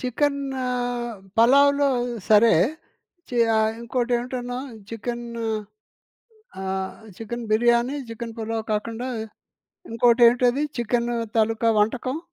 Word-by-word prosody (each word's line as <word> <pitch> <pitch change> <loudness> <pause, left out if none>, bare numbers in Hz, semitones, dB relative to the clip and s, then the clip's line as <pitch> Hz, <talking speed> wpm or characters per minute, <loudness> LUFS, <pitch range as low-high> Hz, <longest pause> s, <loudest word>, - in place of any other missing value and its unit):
చికెన్ను 270 +1 -1 0.8
పలావులో 280 +4 +5 0.4
సరే. 220 +1 +6 0.8
చి 245 - -5 0.2
ఆహ్, 220 0 +2
ఇంకోటి 240 +1 -2
ఏవిటన్నావు? 245 +1 -5 0.2
చికెన్ను 235 +1 -5 1.2
ఆహ్, 190 0 -3 0.2
చికెన్ 235 +1 -6
బిర్యానీ, 240 +5 +3
చికెన్ 230 0 -7
పులావ్ 225 0 -3
కాకుండా, 230 +4 -3 0.8
ఇంకోటేంటది? 240 +3 +4
చికెను 240 +1 0 0.2
తాలూకా 225 +1 +2
వంటకం? 255 +6 0
235 Hz, 90 wpm, -24 LUFS, 225-250 Hz, 1.2 s, సరే